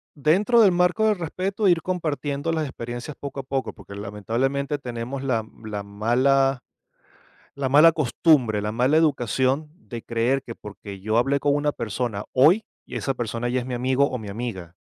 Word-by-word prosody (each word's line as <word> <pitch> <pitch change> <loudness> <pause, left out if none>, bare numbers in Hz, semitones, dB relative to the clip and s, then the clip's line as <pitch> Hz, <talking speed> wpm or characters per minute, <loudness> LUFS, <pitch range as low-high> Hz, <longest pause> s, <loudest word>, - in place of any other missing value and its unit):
Dentro 195 - +3
del 200 - +6
marco 180 +5 +2
del 210 -3 +2
respeto, 190 +5 -2
ir 170 -2 +4
compartiendo 155 -4 -2
las 160 -1 -1
experiencias 120 +3 -6
poco 140 -1 -6
a 135 - -4
poco, 135 0 -3
porque 100 - -12
lamentablemente, 115 +8 -2
tenemos 125 +1 -5
la 125 -4 +1
m 110 +1 -12
la 105 -1 -3
mala 130 +6 +2 1.0
la 135 -2 -1
mala 150 +5 +7
costumbre, 135 -7 +2
la 105 - -2
mala 125 +7 +2
educación, 135 -1 +1
de 120 - -9
creer, 120 +4 0
que 115 - -7
porque 100 -1 -10
yo 110 +4 0
hablé 140 +3 +2
con 145 0 +2
una 145 0 0
persona 110 -2 -3
hoy, 160 +12 +5 0.2
y - - -9
esa 135 - -2
persona 120 0 -3
ya 125 - 0
es 125 - -4
mi 125 - -3
amigo 130 +3 +2
o 125 - -4
mi 105 - -8
amiga. 100 -5 -6
130 Hz, 180 wpm, -24 LUFS, 115-150 Hz, 1.0 s, mala